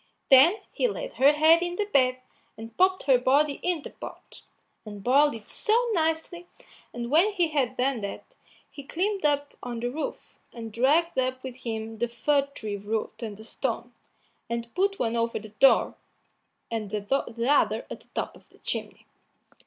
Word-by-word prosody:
Then 275 +9 +8 0.2
he - - +1
laid - - -5
her 275 +2 +5
head 315 +3 +5
in 350 0 -2
the 415 - -1
bed, 255 -9 +2 0.4
and 225 0 -10
popped 375 +1 +3
her 260 -3 +4
body 280 +3 +2
into 350 -4 -2
the - - -30
pot, - - -10 0.4
and 205 -3 -9
boiled 280 +3 +4
it 220 -2 -11
so 445 -1 +2 0.2
nicely; 325 +1 -1 0.4
and 240 +1 -5
when 355 +8 +4
he 350 -4 +1
had 260 -5 0
done 255 -2 0
that, 200 - -7 0.4
he 285 - -9
climbed 380 +7 -2
up 285 -1 +1
on 240 -1 -5
the 245 +1 -2
roof, 305 +4 -6
and 225 -2 -8
dragged 290 +7 +2
up 255 0 -1
with 260 -1 -7
him 225 -2 -5
the 240 - +1
fir 280 +4 +1
tree 210 -2 -4
root 215 +2 -4
and 215 -3 -5
the 220 - -10
stone, 225 - -3 0.6
and 235 0 -4
put 395 +1 +1
one 230 -1 -1
over 230 0 0
the 215 0 -9
door, 240 +6 +4 0.8
and 220 -3 -3
the 225 +3 -2
other 290 +1 +2
at - - -6
the - - -23
top - - -3
of - - -20
the - - -20
chimney. - - -5
260 Hz, 180 wpm, -26 LUFS, 230-320 Hz, 0.8 s, Then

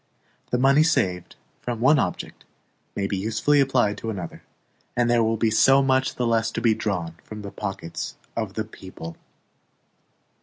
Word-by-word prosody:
The 125 - +1
money 135 +4 +5
saved 95 - +1 0.3
from 120 -2 -3
one 140 +5 +5
object - - -3 0.5
may 100 - -1
be 100 0 -1
usefully 110 +9 +2
applied 125 -6 +2
to 115 - -4
another, 90 -6 -6 0.6
and 120 -1 +3
there 120 -1 +4
will 115 0 +1
be 110 0 +2
so 135 +5 +5
much 130 0 +2
the 125 - -1
less 115 -1 +2
to - - -1
be 115 -1 +3
drawn 90 -7 -3
from 105 -1 -9
the 100 - -6
pockets 95 -4 -5 0.2
of 110 -4 -3
the 110 - -2
people. 95 -5 -9
110 Hz, 165 wpm, -24 LUFS, 100-125 Hz, 0.6 s, money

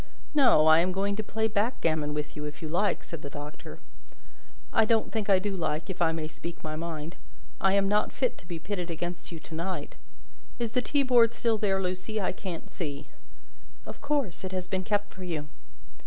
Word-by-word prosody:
"No; 255 - +6
I 160 +1 +8
am 180 +2 +2
going 200 +2 0
to - - +1
play 220 +1 0
backgammon 165 - +1
with 150 0 -3
you, 150 - -4
if 150 +2 -7
you - - -2
like," 180 +6 +1
said 165 -3 -7
the 140 - -6
Doctor. 145 +1 -8 1.0
"I 225 - +6
don't 220 0 +2
think 215 -2 -1
I 195 - +7
do 195 +1 -1
like, 160 +1 -1
if 185 - -7
I 165 -1 +5
may 160 -1 -2
speak 170 +2 -8
my 155 0 -3
mind. 160 0 -5 0.4
I 195 0 +4
am 200 0 +4
not 210 +1 +2
fit 255 -3 0
to 175 - -17
be 170 -2 -4
pitted 180 +1 -3
against 175 +2 -4
you 165 - -6
to 165 - -11
night. 170 -2 -3 0.6
Is 235 -2 -1
the 250 - +2
teaboard 250 -5 +4
still 230 -2 +1
there, 195 -2 +2
Lucie? 185 +4 -2
I 195 - +1
can't 185 -3 -6
see." 145 -4 -5 0.8
"Of - - -9
course, 285 - 0
it 190 0 -4
has 185 -1 -1
been 190 0 -1
kept 205 +1 0
for 190 - -8
you." 155 -4 -3
185 Hz, 205 wpm, -29 LUFS, 160-210 Hz, 1.0 s, I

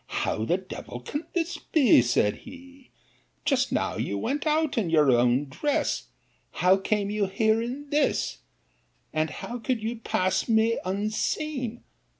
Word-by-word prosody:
How 110 - -1
the 175 - +2
devil 185 -9 -8
can 290 - -5
this 345 0 -1
be? 265 - +5
said 115 -3 +1
he: 270 0 -14 0.6
just 265 -4 +2
now - - -1
you 105 -2 -2
went 290 - -2
out 310 -1 +1
in 215 -8 0
your 150 -4 +4
own 125 +3 +3
dress! 285 - -1 0.5
How 185 +2 +4
came 200 +1 -1
you 210 -1 0
here 220 +3 +2
in 260 +5 -5
this? 295 +1 +1 0.7
and 155 0 +1
how 240 - -6
could 235 -1 -2
you 230 +2 -2
pass 185 -2 0
me 225 +1 +3
unseen? 225 +6 -2
220 Hz, 150 wpm, -26 LUFS, 180-270 Hz, 0.7 s, be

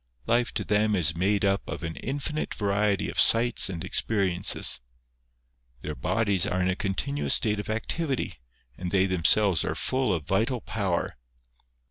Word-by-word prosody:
Life 120 +4 +1
to - - -1
them 105 0 +1
is 85 -3 0
made 100 +3 +1
up 100 0 +1
of - - -6
an 80 0 -4
infinite 145 +3 -4
variety 100 -1 0
of - - -2
sights 115 -1 +5
and 85 -3 -5
experiences. 95 -4 +1 1.0
Their 75 - -4
bodies 100 - 0
are 90 - -1
in 95 0 +1
a - - -2
continuous 120 +10 0
state 105 -2 0
of 105 - -6
activity, 130 - -2 0.4
and 90 +3 -5
they 95 0 +2
themselves 95 +1 +3
are - - -2
full 130 -3 -1
of 80 -5 -2
vital 115 - 0
power. 100 -5 -2
100 Hz, 155 wpm, -26 LUFS, 95-115 Hz, 1.0 s, sights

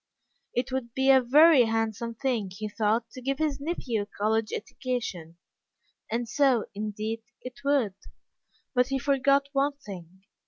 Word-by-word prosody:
It 250 +2 -1
would 245 -3 -4
be 265 +1 +4
a 265 -1 +6
very 285 +1 +6
handsome 225 +1 -2
thing, 235 -6 -1
he 210 +4 -6
thought, 220 +2 0
to 255 - -9
give 270 +2 -1
his 300 -2 -1
nephew 275 -8 -2
a - - -4
college 215 +1 -1
education. 200 -10 -4 0.7
And 235 +1 -2
so, 265 -3 +2
indeed, 215 +2 -4 0.2
it 255 +1 -9
would. 275 -8 +2 0.8
But 250 -1 +3
he 270 0 -1
forgot 275 0 +2
one 280 +1 +1
thing. 190 - -11
240 Hz, 150 wpm, -27 LUFS, 215-275 Hz, 0.8 s, a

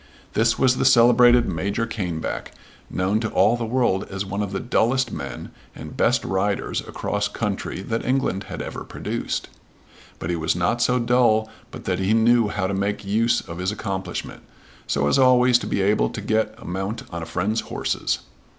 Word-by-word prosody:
This 115 +1 +2
was 130 -1 +3
the - - +1
celebrated 120 0 +6
Major 100 +7 -1
Caneback, 90 -8 -4 0.4
known 95 +4 0
to 110 -1 -2
all 120 - +3
the 120 -1 -3
world 115 -5 +1
as 95 0 -4
one 100 +2 -3
of 100 -2 -3
the 95 - -2
dullest 125 +2 +1
men 70 -3 -6 0.2
and - - -9
best - - +2
riders 95 +1 -1
across - - -2
country 95 - -3
that 115 +2 -2
England 125 -7 0
had - - -6
ever - - -6
produced. - - -4 0.7
But 80 - -4
he - - 0
was 80 0 0
not 90 +7 0
so 125 +1 +3
dull 115 -3 +2 0.2
but - - -10
that 90 -1 -1
he 95 +3 +2
knew 115 0 +4
how 100 -2 -2
to 95 - -1
make 100 +1 -2
use 115 +4 +2
of 85 -1 -9
his 90 +2 -1
accomplishment, 100 -3 -5 0.5
so 70 0 +1
as 75 - +3
always 125 -1 +5
to - - -5
be 100 - 0
able 105 +2 +2
to - - -6
get 110 +1 0
a - - -13
mount 95 +5 -4
on 85 -1 -5
a 80 - -6
friend's 100 +7 -1
horses. - - -2
105 Hz, 185 wpm, -23 LUFS, 95-120 Hz, 0.7 s, celebrated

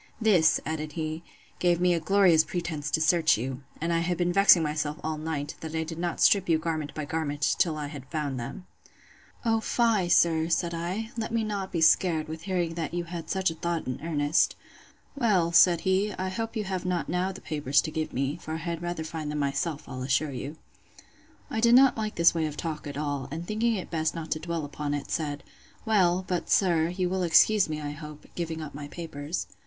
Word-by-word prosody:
This, 190 -8 +4
added 155 -1 -4
he, 155 0 -3 0.4
gave 175 -1 +2
me 180 0 +3
a 170 - +1
glorious 175 -2 +4
pretence 160 -5 -4
to 160 - +1
search 160 -2 +4
you; 130 +3 -4 0.2
and 170 +2 -1
I 165 - +2
have 175 +1 -1
been 175 0 +1
vexing 195 -3 +6
myself 150 0 -2
all 155 -1 -2
night, 155 -2 -3
that 160 0 -6
I 160 - 0
did 165 +1 -7
not 175 -1 -2
strip 195 -3 +4
you 165 - +4
garment 155 -3 -3
by 155 - -3
garment, 145 -1 -1
till 160 -3 +2
I 150 - -3
had 145 -3 -9
found 145 -5 -2
them. 120 +10 -7 0.8
O 225 -1 +3
fie, 220 -5 +1
sir, 165 -2 +3
said 170 0 0
I; 185 +7 -3
let 225 0 -3
me 230 -1 +1
not 200 -3 -3
be 170 - -1
scared, 160 -1 +3
with 160 0 -6
hearing 175 -2 -1
that 165 0 -4
you 175 - -1
had 170 -1 -7
such 190 -3 +1
a - - -5
thought 170 0 -3
in 130 - -4
earnest. 150 -1 +1 0.6
Well, 200 -10 +2
said 170 0 +6
he, 195 +2 +1
I 185 0 -3
hope 225 +4 -4
you 215 - -1
have 190 -2 -3
not 180 -2 -1
now 180 +2 0
the 190 - -9
papers 145 -2 0
to 155 - -5
give 155 0 -3
me; 135 +4 -1
for 160 -2 -6
I - - -2
had 170 0 -4
rather 175 -2 -3
find 155 -1 -5
them 150 - -3
myself, 145 +2 -2
I'll 130 -1 -6
assure 140 +3 +1
you. 140 +4 -6 0.9
I - - -1
did 235 +1 +5
not 265 0 +6
like 215 -1 -3
this 170 0 +5
way 160 -2 0
of 150 -1 -7
talk 155 -3 -4
at 140 -1 -6
all; 145 -3 -2
and 165 +4 -5
thinking 220 +3 0
it 185 - -6
best 160 -1 0
not 165 -1 -6
to 155 - 0
dwell 165 -1 -3
upon 145 0 -3
it, 145 - -6
said, 145 -3 -2 0.4
Well, 185 -4 +3
but, 180 -2 -2
sir, 170 -4 +3
you 180 +1 -1
will 185 +1 -1
excuse 180 +3 +5
me, 155 -1 -3
I 145 -1 -4
hope, 150 0 -10
giving 165 -2 -4
up 150 - -8
my 145 0 -7
papers. 155 0 -5
165 Hz, 220 wpm, -27 LUFS, 155-180 Hz, 0.9 s, vexing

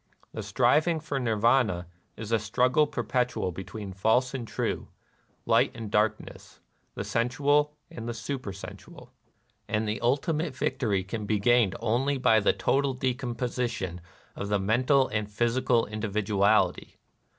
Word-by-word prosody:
The - - -4
striving 160 +2 +2
for 145 -3 -3
Nirvana 115 -5 +2 0.3
is 110 0 -7
a 115 - +3
struggle 125 +7 +2
perpet 125 -3 -1
ual 90 - -2
between 95 +2 -7
false 110 +6 +2
and 125 -4 -4
true, - - -3 0.6
light - - +4
and 115 -3 -7
darkness, 105 0 -1 0.4
the - - -3
sensual 145 +5 +1 0.2
and 115 0 -6
the - - -2
supersensual; 115 -6 -7 0.6
and 110 0 -1
the 105 +2 -2
ul 120 +4 +3
timate 155 -2 -2
victory 105 -6 0
can 105 +2 -5
be 110 - +2
gained 115 -2 +3
only 135 +5 +1
by 115 -4 +4
the 100 - +3
total 140 -1 0
decomposition 120 -7 -2 0.3
of 100 - -5
the 105 - +2
mental 125 +7 +2
and 105 -1 -2
the - - -21
physical 120 +2 +1
individuality. 105 -1 +1
115 Hz, 140 wpm, -27 LUFS, 105-130 Hz, 0.6 s, light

